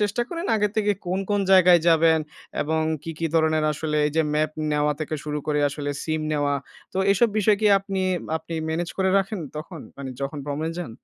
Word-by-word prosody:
চেষ্টা 210 +3 +1
করেন? 340 0 -4
আগের 210 -1 +1
থেকে 210 -1 +2
কোন, 185 +2 0
কোন 205 0 +2
জায়গায় 180 -2 +7
যাবেন 165 -1 +5 0.4
এবং 160 +1 0 0.2
কী, 165 - -5
কী 165 - 0
ধরনের 155 -1 +3
আসলে? 150 0 -2
এই 150 - -3
যে 160 - +4
ম্যাপ 155 0 +1 0.2
নেওয়া 150 0 +2
থেকে 155 0 -3
শুরু 150 0 -2
করে 150 -1 +1
আসলে, 145 0 -4
সিম 155 -1 -1
নেওয়া, 145 -1 +1 0.4
তো 190 - -3
এসব 235 +4 +3
বিষয় 210 0 +4
কি 215 - +3
আপনি 195 -1 -4 0.4
আপনি, 160 +1 -7
ম্যানেজ 165 +2 -2
করে 190 0 +2
রাখেন 195 0 -2 0.2
তখন? 160 +1 -7 0.2
মানে 140 -2 -6
যখন 140 +2 -3
ভ্রমনে 150 +3 -3
যান? 175 -8 -5
160 Hz, 200 wpm, -24 LUFS, 150-190 Hz, 0.4 s, জায়গায়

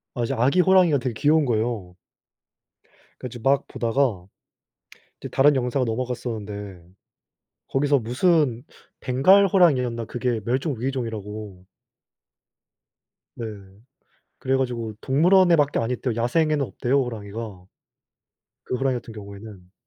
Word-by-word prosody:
아 120 - -1
이제 135 - -2
아기 135 +9 +2
호랑이가 180 -6 +4
되게 125 -2 -3
귀여운 150 +3 +3
거예요. 110 -6 -2 1.3
그 125 - -6
좀 120 -1 -10
막 140 +1 +2
보다가 115 -6 -1 0.9
이제 - - -6
다른 145 +2 +4
영상으로 125 -1 0
넘어갔었는데 110 -6 -5 0.9
거기서 140 +1 +2
무슨 125 0 +1 0.4
벵갈 185 +11 +4
호랑이였나 130 - +2
그게 120 -2 -2
멸종위기종이라고 115 - -4 1.7
네. 115 - -6 0.9
그래 135 0 0
가지고 120 -4 -3
동물원에 175 +6 +4
밖에 145 -2 +1
안 115 +1 -2
있대요 125 -1 -2
야생에는 150 +5 +1
없대요 130 +4 0
호랑이가. 105 -4 -7 1.0
그 125 - -2
호랑이 135 0 0
같은 120 -2 -7
경우에는. 100 -3 -11
125 Hz, 290 characters per minute, -23 LUFS, 110-140 Hz, 1.7 s, 호랑이가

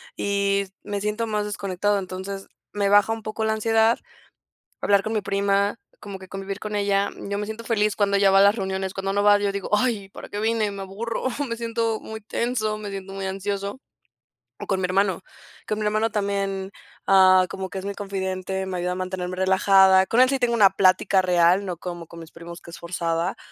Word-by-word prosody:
y 200 0 0 0.2
me 205 -1 -4
siento 210 +2 -2
más 210 -1 -1
desconectado. 200 0 -1
Entonces, 190 +1 -6 0.2
me 200 -1 0
baja 205 +1 +5
un 225 0 -3
poco 215 +1 -4
la 220 - +1
ansiedad 225 +1 +2 0.8
hablar 200 -1 +3
con 220 - -3
mi 215 - 0
prima, 200 +1 0 0.2
como 200 -2 -8
que 190 - -12
convivir 195 +1 -6
con 210 0 -5
ella. 200 0 +1 0.2
Yo 200 - -1
me 210 - -3
siento 220 +2 -7
feliz 215 -3 +1
cuando 200 -1 +2
ella 195 -1 +4
va 195 - +6
a - - +7
las 200 +2 +5
reuniones, 190 -2 -3
cuando 195 0 -2
no 205 - +1
va, 205 0 +6
yo 205 -1 0
digo: 200 -1 -5
"Ay, 210 -5 -1
¿para - - -11
qué 205 - -5
vine?, 220 -1 0
me 200 -1 -7
aburro", 215 +6 -5 0.2
me 230 - -3
siento 230 -1 -1
muy 220 0 -8
tenso, 220 0 -2
me 210 - -6
siento 195 -1 -7
muy 195 0 -4
ansioso, 200 +4 -4 0.8
o - - -7
con 190 -1 0
mi 180 - +1
hermano. 190 0 +1 0.5
Con 215 - -1
mi 215 - -2
hermano 215 +2 +1
también, 200 -1 -2 0.3
ah, 185 -1 +6
como 190 -1 -6
que 195 - -5
es 190 - -7
mi 200 0 -4
confidente, 190 -1 -3
me 185 -1 -3
ayuda 180 +1 -1
a - - -2
mantenerme 185 0 -4
relajada. 190 0 +5
Con 235 - +2
él 255 - +7
sí 270 0 0
tengo 240 -1 +2
una 205 -4 +6
plática 190 0 +3
real, 180 +1 +3
no 180 -2 -4
como 175 -1 -7
con 170 - -12
mis 165 0 -12
primos 170 +1 -10
que 170 - -13
es - - -9
forzada, 170 0 -2
200 Hz, 215 wpm, -24 LUFS, 190-210 Hz, 0.8 s, a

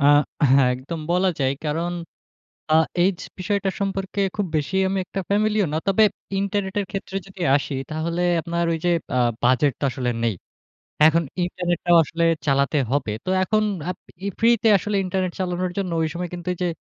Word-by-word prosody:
আ - - +1 0.5
হ্যাঁ 135 -1 +5
একদম 145 +6 -6
বলা 180 +2 +3
যায়। 135 -1 +1
কারণ 165 +4 -1 0.8
আ - - +6 0.3
এইজ 185 -2 +2 0.2
বিষয়টা 200 0 0
সম্পর্কে 195 0 -2 0.2
খুব 205 - 0
বেশি 150 +5 -2
আমি 195 +1 -1
একটা 195 - -5
ফ্যামিলিয়ার 210 -2 +2
না। - - +1
তবে 195 +3 +4 0.4
ইন্টারনেটের 200 0 -1
ক্ষেত্রে 195 -1 -5
যদি 195 -1 -10
আসি 145 0 -1 0.2
তাহলে 165 +3 -2 0.2
আপনার 170 +1 -2
ওই - - 0
যে - - +3 0.3
আ - - +3 0.2
বাজেট 130 +3 +3
তো - - -5
আসলে 125 0 -2
নেই। 115 -4 +1 0.7
এখন 165 +2 +5 0.2
ইন্টারনেটটাও 175 -1 0
আসলে 165 +2 -2 0.2
চালাতে 140 +2 +2
হবে। 140 -6 0
তো - - -3
এখন 215 +3 +2 0.3
আপ 180 - -4 0.3
ই - - 0
ফ্রিতে 230 -1 +4
আসলে 205 +2 -3
ইন্টারনেট 185 -1 -1
চালানোর 180 -1 -1
জন্য 185 -3 -1
ওই 160 - +1
সময় 175 0 -4
কিন্তু 175 0 -7
এই - - -10
যে - - +2
180 Hz, 175 wpm, -23 LUFS, 155-195 Hz, 0.8 s, আ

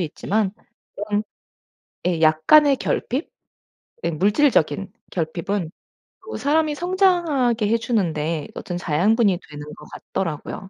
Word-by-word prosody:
있지만 190 +5 -1 0.4
그런 205 0 -1 0.8
예 175 -3 0
약간의 270 - +5
결핍 260 +3 -2 0.7
음 155 - -1
물질적인 195 - +2 0.2
결핍은 170 +2 -2 0.6
또 445 - -6
사람이 305 +2 +1
성장하게 340 - +2
해주는데 170 -10 0
어떤 175 - -5
자양분이 185 +4 +2
되는 145 0 -8
것 - - -13
같더라고요. 185 +2 -5
205 Hz, 255 characters per minute, -22 LUFS, 165-270 Hz, 0.8 s, 약간의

